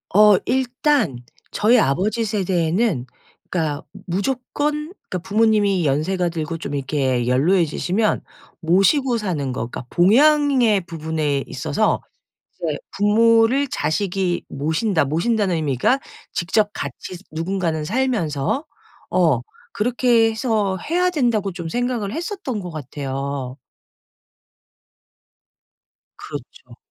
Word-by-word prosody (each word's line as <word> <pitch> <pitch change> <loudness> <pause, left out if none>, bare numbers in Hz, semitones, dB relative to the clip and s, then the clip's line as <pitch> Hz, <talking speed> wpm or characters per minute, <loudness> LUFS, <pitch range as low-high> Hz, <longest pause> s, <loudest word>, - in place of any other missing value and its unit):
어 210 -1 +7
일단 255 - +1 0.3
저희 225 +4 +4
아버지 205 - +1
세대에는 185 - 0 0.4
그러니까 155 -5 -2 0.2
무조건 270 - -2 0.2
그러니까 185 - -2
부모님이 205 -4 +3
연세가 170 +6 +1
들고 165 0 -4
좀 150 -3 -5
이렇게 130 -3 0
연로해지시면 175 - +1 0.4
모시고 195 - +3
사는 165 - -2
거 120 -2 -3
그러니까 125 - -8
봉양의 255 - +4
부분에 155 -4 -2
있어서 - - 0 0.5
이제 - - -3 0.2
'부모를 230 +6 +4
자식이 175 +2 -1
모신다.' 160 +6 0
모신다는 185 - +1
의미가 155 - +1 0.3
직접 205 +5 +1
같이 140 +6 -6
누군가는 165 -1 -2
살면서 220 - -1 0.5
어 - - +3 0.3
그렇게 235 0 +2
해서 220 -4 0
해야 360 +2 +2
된다고 235 - +1
좀 170 -2 -6
생각을 240 -2 -2
했었던 340 - -4
것 180 -2 -7
같아요. 135 -2 -5 2.6
그렇죠. - - -10
195 Hz, 255 characters per minute, -21 LUFS, 155-230 Hz, 2.6 s, 어